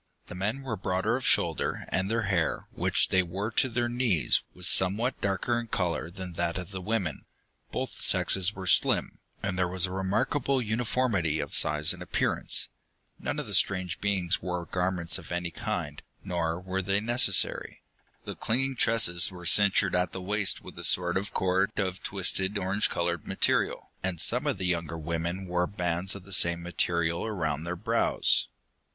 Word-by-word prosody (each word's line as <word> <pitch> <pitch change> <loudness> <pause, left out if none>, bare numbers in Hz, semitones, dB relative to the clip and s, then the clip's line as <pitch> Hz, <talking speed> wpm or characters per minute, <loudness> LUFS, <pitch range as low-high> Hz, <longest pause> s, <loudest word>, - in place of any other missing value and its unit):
The - - -10
men 105 +9 -3
were 125 -4 -3
broader 95 +3 -1
of 130 - -4
shoulder, - - +1
and 95 +1 -1
their 115 0 0
hair, 95 -5 0
which - - +1
they 95 - +4
wore 95 +5 -4
to 130 - +2
their 120 0 -1
knees, 120 - +2
was 90 -1 -4
somewhat 105 +7 +2
darker 100 +4 0
in 120 - -6
color 85 -5 -2
than 90 0 -8
that 85 0 -2
of 90 +1 -7
the 95 -1 -6
women. 95 -4 -2 0.5
Both - - -4
sexes 95 0 +3
were 95 0 -7
slim, 90 - +2 0.2
and 95 -2 -2
there 90 - +2
was 90 +1 +2
a 90 - -6
remarkable 100 +9 0
uniformity 110 -8 0
of - - -4
size 75 +3 +3
and 90 - -12
appearance. 90 - +1 0.5
None - - -3
of - - -3
the - - -8
strange 95 -3 +1
beings 95 -3 0
wore 90 -1 -3
garments 90 -1 -1
of - - -12
any 85 -1 -2
kind, 75 -2 -4 0.2
nor 85 -3 -2
were 95 +1 -3
they 100 +1 0
necessary. 115 -3 +2 0.4
The - - -5
clinging 130 +3 -1
tresses 100 -8 +4
were 90 -1 -11
cinctured 100 +1 +5
at 90 0 0
the - - -5
waist 100 +1 +2
with - - -11
a - - -6
sort 90 -1 +3
of 100 +3 -2
cord 95 +2 0
of 95 -2 -2
twisted 95 +1 +1
orange 100 +2 0
colored 85 -1 -2
material, - - 0
and 90 -3 -3
some - - +3
of - - 0
the 90 - -3
younger 85 -2 -2
women 85 +4 -3
wore 90 0 0
bands 90 0 -1
of 100 - -9
the 100 +1 -11
same 85 -1 +3
material 85 -1 0
around 80 -8 -3
their 90 +1 -3
brows. 85 - +1
95 Hz, 180 wpm, -28 LUFS, 85-100 Hz, 0.5 s, cinctured